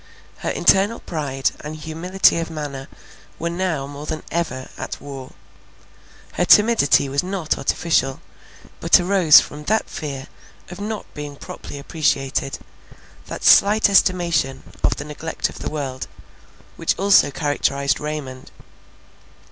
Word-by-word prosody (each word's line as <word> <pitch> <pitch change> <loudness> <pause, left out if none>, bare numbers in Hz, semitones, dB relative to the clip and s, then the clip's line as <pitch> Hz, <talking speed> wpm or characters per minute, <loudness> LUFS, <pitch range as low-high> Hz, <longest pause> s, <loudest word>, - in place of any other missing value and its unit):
Her - - -3
internal 200 +4 +3
pride 140 -5 -2
and 150 +1 -7
humility 165 +4 +1
of 165 - -4
manner 145 -4 -6 0.5
were 170 +1 -3
now 170 -5 -2
more 145 +2 -9
than 155 - -4
ever 130 -7 -3
at - - -6
war. 135 -2 -9 1.0
Her 180 - 0
timidity 210 -10 +5
was 140 +1 0
not 180 -3 -2
artificial, 135 -6 0 0.6
but - - +5
arose 180 -4 +6
from 150 +1 -9
that 220 +5 +1
fear 140 -3 -6 0.5
of 180 - -9
not 215 0 -4
being 145 -1 -7
properly 140 - -9
appreciated, 140 -3 -1 0.7
that - - -7
slight 205 0 +6
estimation 170 -9 +2 0.2
of - - +2
the 145 - -7
neglect 155 +2 -4
of - - -11
the - - -4
world, 135 -4 -5 0.7
which - - 0
also 195 -6 +5
characterized 140 -1 0
Raymond. 150 -4 -6
150 Hz, 130 wpm, -21 LUFS, 140-180 Hz, 1.0 s, arose